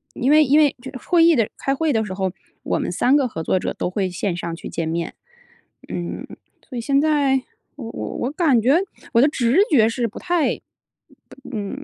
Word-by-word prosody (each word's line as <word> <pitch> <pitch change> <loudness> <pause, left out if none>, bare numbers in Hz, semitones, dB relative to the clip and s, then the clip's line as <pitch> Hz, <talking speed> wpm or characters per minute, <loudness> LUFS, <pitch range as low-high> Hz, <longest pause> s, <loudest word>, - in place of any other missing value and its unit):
因 260 +4 +1
为 305 0 +7
因 285 +3 +4
为 295 -2 +3
就 265 - -8
会 345 -2 +3
议 335 -1 +6
的 230 -5 +2
开 275 - 0
会 310 -1 0
的 220 -1 +1
时 210 - -7
候， 190 -1 -1 0.3
我 - - -1
们 - - -2
3 250 +10 +3
个 275 -3 +3
合 160 -9 -6
作 185 - +1
者 - - -3
都 - - -3
会 185 0 -1
线 180 +1 -2
上 170 -1 -4
去 165 - -9
见 165 -1 -3
面。 165 +1 -3 0.8
嗯， 175 -1 -5 0.4
所 260 - -9
以 235 - -2
现 275 +3 +2
在， 290 -3 +2 0.4
我 250 -6 -7
我 - - -6
我 255 - -2
感 300 -7 +3
觉 270 +9 +4 0.3
我 230 - +5
的 280 - +6
直 265 +2 +2
觉 230 -8 +5
是 235 0 -1
不 210 - -11
太 345 -4 0 0.9
嗯， 220 +5 -5
250 Hz, 225 characters per minute, -21 LUFS, 200-290 Hz, 0.9 s, 为